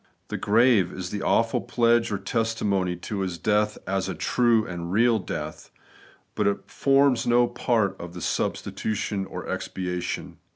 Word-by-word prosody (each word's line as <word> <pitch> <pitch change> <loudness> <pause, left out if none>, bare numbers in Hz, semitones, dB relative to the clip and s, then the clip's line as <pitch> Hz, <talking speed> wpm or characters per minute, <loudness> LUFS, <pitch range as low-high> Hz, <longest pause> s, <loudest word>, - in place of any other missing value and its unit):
The - - -3
grave 110 -3 +3
ia - - -8
the 95 +3 -4
awful 115 +3 +2
pledge 120 -1 +2
or 100 - 0
testimony 100 -5 -1
to 100 +4 -5
His 95 -3 -2
death 105 +1 +1
as 95 0 -1
a 95 - -3
true 115 +5 +2
and 85 -1 -5
real 115 +2 +3
death; 95 - -6 0.6
but - - 0
it 100 - -2
forms 135 -2 +3
no 120 0 +5
part 115 -4 0
of 85 0 -8
the 90 - -7
substitution 100 +1 -2
or - - -7
expiation. 90 -1 -4
105 Hz, 155 wpm, -25 LUFS, 95-115 Hz, 0.6 s, no